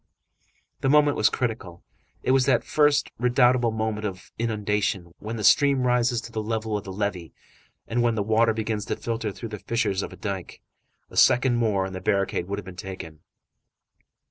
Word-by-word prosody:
The 135 - 0
moment 150 0 +4
was - - +3
critical. 110 -8 -4 0.4
It - - +1
was 130 0 +3
that 135 - +3
first, 145 -1 +2
redoubtable 125 0 +3
moment 110 -1 -2
of 95 -3 -6
inundation, 105 -5 -1
when 110 +3 -5
the 110 - -4
stream 140 +2 +4
rises 125 -1 +2
to 115 - -10
the 110 - -3
level 110 0 -2
of 105 - -3
the 95 - -6
levee 95 -6 -3 0.5
and 120 +1 0
when 120 -1 +2
the 105 - 0
water 110 +1 +2
begins 110 -1 -2
to - - -2
filter 115 -2 -3
through 115 +3 -8
the 105 -1 -7
fissures 100 -4 -1
of - - -7
dike. 95 -3 -5 0.5
A - - -9
second 125 -1 +5
more 105 -5 +1
and 95 - -6
the 95 - -6
barricade 100 -2 0
would 100 +1 -3
have 100 - -7
been 95 -1 -9
taken. 90 -4 -8
110 Hz, 185 wpm, -25 LUFS, 100-120 Hz, 0.5 s, second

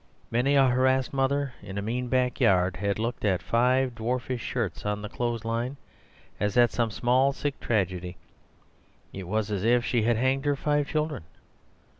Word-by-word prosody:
Many 125 +5 +2
a 135 -1 +6
harassed 130 +1 +2
mother 135 0 0
in 95 - -8
a 100 - -2
mean 125 +4 -2
backyard 100 -8 +2
had 100 +1 -1
looked 115 +2 -3
at 95 -4 +1
five 125 +2 +2
dwarfish 120 +2 -3
shirts 110 -9 -3
on 105 0 -2
the 105 - -5
clothes 120 -1 -3
line 120 +4 -2 0.6
as 105 +1 -1
at 120 -1 +5
some 120 -2 0
small, 125 +5 +2
sick 145 0 -3
tragedy; 90 -5 -1 1.0
it 95 -2 -7
was 110 +2 -1
as 100 -2 -2
if 120 +2 +3
she 120 - +1
had 115 +1 +2
hanged 130 +3 +1
her 145 0 +2
five 145 0 0
children. 155 - -2
120 Hz, 170 wpm, -27 LUFS, 105-130 Hz, 1.0 s, a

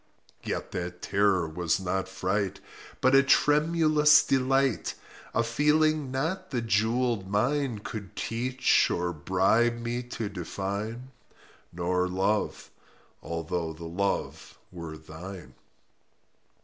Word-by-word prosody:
Yet - - -4
that 90 -1 -5
terror 100 -4 +2
was 80 +2 -1
not 95 0 -2
fright, 95 +1 -2 0.4
But 130 +1 +4
a 135 - +8
tremulous 150 +2 +4
delight— 135 -1 +1 0.4
A 115 - +3
feeling 150 +4 +2
not 150 +8 -2
the 130 -3 -1
jewelled 115 -1 0
mine 120 +2 0
Could 100 -4 -7
teach 125 +2 +1
or 90 0 -1
bribe 95 +9 +2
me 120 +1 -3
to 120 -3 -5
define— 100 +6 -5 0.6
Nor 90 +1 0
Love—although 90 -3 -3
the 85 +2 -9
Love 95 +4 -3
were 85 -3 -7
thine. 85 +5 -10
105 Hz, 105 wpm, -28 LUFS, 90-130 Hz, 0.6 s, a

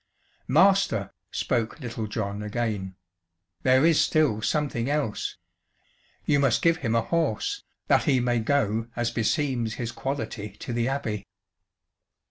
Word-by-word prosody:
"Master," 190 - +3 0.2
spoke 115 +5 -1
Little 115 -4 -4
John 105 -1 -3
again, 105 -3 -3 0.7
"there 130 +3 +4
is 165 -2 +5
still 145 -9 +2
something 125 +1 0
else. 145 -8 -1 0.9
You 145 -1 +3
must 135 -5 +2
give 165 0 +4
him 115 -7 -1
a 115 - +4
horse, 290 - -1 0.2
that - - +3
he 135 -5 +3
may 120 -1 +1
go 115 -3 +1
as 120 0 0
beseems 120 -1 0
his 115 -2 -3
quality 110 -7 -4
to 120 - -5
the 120 0 0
Abbey." 110 -7 -3
120 Hz, 130 wpm, -26 LUFS, 110-145 Hz, 0.9 s, is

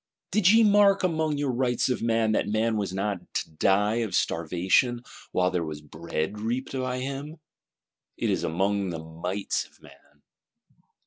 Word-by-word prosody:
Did 205 -4 +4
ye 225 +1 +6
mark 205 -2 +5
among 160 -4 0
your 140 -2 0
Rights 125 -1 +1
of 125 - -1
Man, 115 -1 +2
that - - +1
man 110 +2 +1
was 100 -3 -2
not 100 0 -2 0.2
to - - -2
die 100 +7 +2
of 110 -6 -1
starvation, 90 +9 +1 0.3
while 90 0 +2
there 90 -2 0
was 80 -2 -5
bread 80 +5 -4
reaped 120 +5 -3
by 130 -1 -2
him? 140 +4 -5 0.8
It - - 0
is - - -1
among 95 +3 0
the 85 - -4
Mights 90 +5 -3
of - - -23
Man. 75 0 -20
110 Hz, 165 wpm, -26 LUFS, 90-130 Hz, 0.8 s, ye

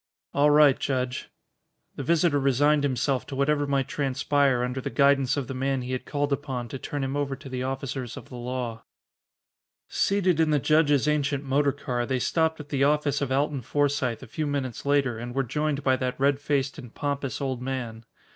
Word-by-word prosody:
"All 145 +1 +4
right, 145 -2 +6
Judge." 130 -1 -2 0.7
The - - -5
visitor 160 0 +2
resigned 145 +2 +3
himself 135 -1 0
to 140 - -6
whatever 145 +1 +1
might 135 -1 +1
transpire 140 -2 +1
under 125 +1 -2
the - - -3
guidance 135 +1 +3
of 140 - -1
the 130 - -6
man 135 0 -1
he 125 - -5
had 130 0 -4
called 145 -1 0
upon 130 -4 -4
to 135 - -6
turn 145 +1 -4
him 135 +1 -2
over 140 -1 -1
to 135 - -12
the 130 -1 -4
officers 130 -2 -4
of - - -10
the - - -10
law. 120 -2 -4 1.1
Seated 190 -4 +1
in 160 -1 +3
the 150 - +3
judge's 145 -1 +3
ancient 145 -2 +1
motor 140 +1 +2
car, 125 -3 -3
they 130 - 0
stopped 160 +5 +1
at 145 -1 -9
the 140 -2 +1
office 145 -1 +2
of 135 -2 -1
Alton 140 0 0
Forsythe 140 -3 0
a - - -10
few 155 +7 -3
minutes 140 -3 -3
later 135 -5 +2
and 120 +1 -6
were 135 - +2
joined 145 +3 -1
by 130 -2 +3
that 125 0 -3
red 140 0 +3
faced 140 -1 -1
and 125 -5 -10
pompous 140 -2 -2
old 130 -3 -2
man. 125 -4 -4
140 Hz, 200 wpm, -26 LUFS, 130-145 Hz, 1.1 s, right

